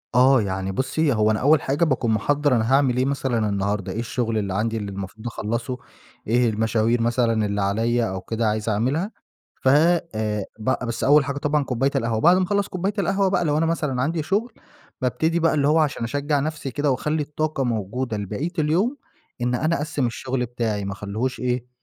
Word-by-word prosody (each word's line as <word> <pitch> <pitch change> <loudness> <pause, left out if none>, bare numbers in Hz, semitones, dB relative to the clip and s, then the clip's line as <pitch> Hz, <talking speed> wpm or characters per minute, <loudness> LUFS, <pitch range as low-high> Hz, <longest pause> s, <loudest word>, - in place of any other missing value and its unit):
آه، 130 0 +6
يعني 95 -1 -2
بُصي، 135 +7 0
هو 110 -1 +3
أنا 110 - 0
أول 150 +2 +4
حاجة 140 +5 0
باكون 130 -6 0
مِحَضَّر 145 +4 +2
أنا 115 +2 +1
هاعمل 135 -3 +3
إيه 130 - +2
مثلًا 130 -6 0
النهاردة؟ 100 0 -1
إيه - - -4
الشغل 115 -1 -1
اللي 100 -3 -2
عندي 110 +3 -1
اللي 100 -2 -4
المفروض 100 +4 -7
أخلصه؟ 115 +2 -3 0.5
إيه 120 +2 +3
المشاوير 110 +2 +1
مثلًا 115 -2 +1
اللي 100 0 -1
عليَّ 115 +3 +1
أو 95 0 -4
كده، 115 +2 -1
عايز 110 +1 -1
أعملها؟ 130 - 0 0.5
ف - - +1
آآ، 130 - +2
ب 125 +3 -1
بس 115 - -3
أول 145 +1 +5
حاجة 140 0 -3
طبعًا 145 +1 +1
كوباية 135 +1 0
القهوة، 115 -4 0
بعد 175 +3 +6
ما 185 - +2
أخلص 200 +2 0
كوباية 190 +3 -2
القهوة 195 +1 +2
بَقى 185 - +1
لو 150 -1 +1
أنا 160 - +2
مثلًا 150 -6 -1
عندي 160 +4 -1
شغل، 210 +8 -1 0.5
بابتدي 160 +7 +1
بَقى 165 -1 +3
اللي 145 -2 +2
هو 155 +2 +4
عشان 145 -6 0
أشجع 145 +4 0
نفسي 150 -1 -3
كده 145 +2 0
وأخلي 150 +4 -1
الطاقة 150 -1 -2
موجودة 115 0 -2
لبقية 105 - -3
اليوم، 180 - +1 0.4
إن 125 +1 +1
أنا 155 +6 +1
أَقَسِّم 145 -3 -1
الشغل 125 +1 -2
بتاعي، 110 -4 -2
ما 100 - -3
أخليهوش 105 +6 -3
إيه 125 -1 -2
125 Hz, 195 wpm, -23 LUFS, 110-150 Hz, 0.5 s, آه